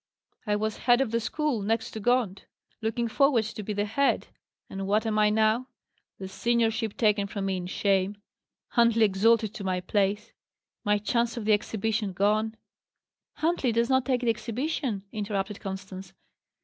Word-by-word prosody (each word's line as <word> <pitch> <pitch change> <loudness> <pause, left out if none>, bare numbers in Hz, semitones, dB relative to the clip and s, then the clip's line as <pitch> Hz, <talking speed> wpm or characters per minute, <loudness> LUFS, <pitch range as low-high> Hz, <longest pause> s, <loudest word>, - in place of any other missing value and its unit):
I 210 - +2
was 215 +1 -2
head 245 0 +3
of 270 -5 0
the 230 - +1
school, 285 0 -1
next 220 +2 -1
to 220 - -6
Gaunt; 230 -4 0 0.4
looking 225 +2 -1
forward 265 -1 +3
to 215 0 -6
be 210 - -5
the 205 0 0
head; 275 +7 +1 0.4
and 195 0 -5
what 215 +3 +2
am 215 -1 +1
I 210 0 +5
now? 220 +3 +2 0.5
The 190 - -6
seniorship 225 +1 0
taken 210 -3 +2
from 200 -1 -4
me 190 -1 -1
in 180 -1 -5
shame; 195 +1 +1 0.5
Huntley 235 -2 +4
exalted 215 +2 +3
to 200 - -7
my 185 -1 0
place; 200 +3 -1 0.5
my 210 -1 +3
chance 235 +3 0
of 225 - -4
the 215 - +4
exhibition 210 -1 -1
gone 215 +3 +1 0.4
" - - -63
"Huntley 320 -7 +2
does 235 +3 +1
not 260 -1 +4
take 255 -2 +1
the 240 - +1
exhibition," 235 -1 -3
interrupted 205 -1 -3
Constance. 190 -1 -7
215 Hz, 170 wpm, -27 LUFS, 200-235 Hz, 0.5 s, I